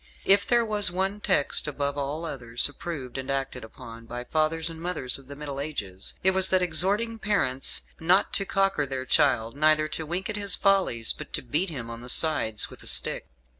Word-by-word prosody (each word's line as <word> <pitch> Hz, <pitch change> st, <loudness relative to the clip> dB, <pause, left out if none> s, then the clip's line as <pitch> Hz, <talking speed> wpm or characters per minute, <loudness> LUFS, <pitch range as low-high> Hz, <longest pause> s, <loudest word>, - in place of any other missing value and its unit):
If 200 Hz, +1 st, +4 dB
there 240 Hz, -1 st, +3 dB
was 210 Hz, -2 st, +3 dB
one 190 Hz, +3 st, -1 dB
text, 185 Hz, -8 st, +3 dB
above 140 Hz, -1 st, -2 dB
all 145 Hz, +3 st, -3 dB
others, 125 Hz, -6 st, +1 dB
approved 145 Hz, -4 st, -6 dB
and 130 Hz, -, -6 dB
acted 135 Hz, -2 st, -3 dB
upon 115 Hz, +1 st, -12 dB
by 120 Hz, +1 st, -6 dB
fathers 155 Hz, +4 st, 0 dB
and 165 Hz, -1 st, -2 dB
mothers 165 Hz, -8 st, 0 dB
of 135 Hz, -, -17 dB
the 140 Hz, -, -9 dB
Middle 140 Hz, -1 st, -6 dB
Ages, 100 Hz, -11 st, -5 dB
it 190 Hz, -, +4 dB
was 190 Hz, 0 st, +3 dB
that 185 Hz, -1 st, +3 dB
exhorting 200 Hz, +7 st, +1 dB
parents 135 Hz, -13 st, 0 dB, 0.2 s
not 180 Hz, +4 st, +2 dB
to 195 Hz, -, 0 dB
cocker 195 Hz, -7 st, 0 dB
their 130 Hz, -1 st, -4 dB
child, 130 Hz, -4 st, +2 dB
neither 155 Hz, +1 st, +3 dB
to 160 Hz, 0 st, -5 dB
wink 180 Hz, +5 st, -3 dB
at 215 Hz, -2 st, -4 dB
his 200 Hz, -2 st, -1 dB
follies, 190 Hz, -, +2 dB
but -, -, -10 dB
to -, -, -2 dB
beat 155 Hz, +9 st, 0 dB
him 125 Hz, -7 st, -6 dB
on 115 Hz, 0 st, -8 dB
the 125 Hz, -, -10 dB
sides 120 Hz, -8 st, +2 dB
with -, -, -11 dB
a -, -, -9 dB
stick. -, -, +1 dB
155 Hz, 205 wpm, -26 LUFS, 130-190 Hz, 0.2 s, If